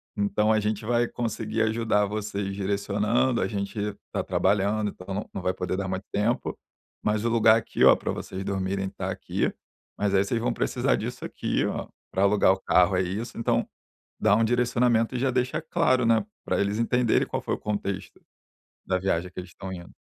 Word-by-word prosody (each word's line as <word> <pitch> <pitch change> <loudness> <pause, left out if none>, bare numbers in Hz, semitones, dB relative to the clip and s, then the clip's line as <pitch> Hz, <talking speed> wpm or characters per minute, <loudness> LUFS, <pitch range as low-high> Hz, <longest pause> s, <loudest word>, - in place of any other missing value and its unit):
então 100 +1 +1
a 110 - +3
gente 105 +1 -2
vai 120 +1 +2
conseguir 110 -2 -2
ajudar 110 -2 +2
vocês 100 -1 -3
direcionando. 105 +5 +1
A - - +1
gente 105 0 -3 0.2
tá - - -1
trabalhando, 105 +1 +1
então 95 +1 -8
não 100 +2 -4
não 100 - -4
vai 90 +1 0
poder 90 0 -2
dar 95 0 -3
muito 95 +1 -3
tempo, 110 +4 0 0.5
mas 105 +1 0
o - - +3
lugar 115 -1 +5
aqui, 115 - -1
ó, - - +9
pra - - -3
vocês 95 - -6
dormirem 95 0 -1
tá - - -4
aqui, - - -2 0.4
mas 100 -1 +1
aí 95 - +5
vocês 115 +4 -1
vão 115 - 0
precisar - - +1
disso - - -5
aqui, - - -1
ó, - - -3 0.2
pra 95 - +1
alugar 100 -1 +5
o 95 - -5
carro 90 +1 +4
é 90 - +3
isso.", 100 +7 -4
então, 115 - +1 0.5
dá 105 - +4
um 115 - +3
direcionamento 120 0 +2
e - - -1
já 130 +1 +1
deixa 125 0 0
claro, 155 -6 +2
né, 115 0 +4 0.2
pra - - 0
eles 100 +1 0
entenderem 120 0 +2
qual - - -3
foi - - -2
o - - -9
contexto 100 -2 -4 0.7
da 95 - +1
viagem 90 -1 0
que 90 - -7
eles 90 0 -8
estão 95 +2 -8
indo. 85 -1 -9
105 Hz, 200 wpm, -26 LUFS, 95-115 Hz, 0.7 s, ó